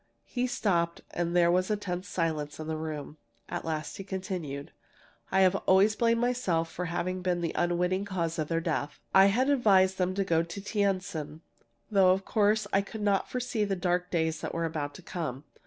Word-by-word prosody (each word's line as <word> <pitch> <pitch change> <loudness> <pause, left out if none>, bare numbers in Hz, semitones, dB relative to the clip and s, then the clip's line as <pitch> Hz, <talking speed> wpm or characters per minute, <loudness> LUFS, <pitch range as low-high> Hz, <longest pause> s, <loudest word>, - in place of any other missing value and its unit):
He 250 0 -1
stopped, 170 -8 0
and 175 0 -2
there 170 -1 +5
was 185 +2 +2
a 210 - +1
tense 185 -1 -4
silence 160 -5 -2
in 155 - -5
the 160 0 -2
room. 155 -1 -5 0.3
At - - -4
last 155 -2 -3
he 195 - -6
continued: 180 -7 -5 0.6
"I 190 - +4
have 185 -1 +5
always 195 +3 +5
blamed 230 0 +2
myself 195 -10 0
for 180 - -4
having 175 +2 -2
been 180 -1 0
the 165 - -1
unwitting 180 +3 0
cause 170 -5 -2
of 155 - -1
their 165 0 0
death. 155 -3 -2
I 190 +1 +8
had 245 +7 +2
advised 195 -9 +4
them 185 0 +1
to 200 - +1
go 165 -4 +2
to 170 +3 -6
Tientsin, 185 -7 -2 0.5
though 190 -3 +6
of 190 +1 -3
course 215 0 +2
I 195 - +4
could 210 +2 -8
not 200 -2 +1
foresee 250 -3 -1
the 200 -1 0
dark 180 -1 0
days 160 -2 0
that - - -4
were 165 0 0
about 150 -3 -3
to 185 - -11
come. 150 -7 -4
180 Hz, 200 wpm, -29 LUFS, 165-200 Hz, 0.6 s, I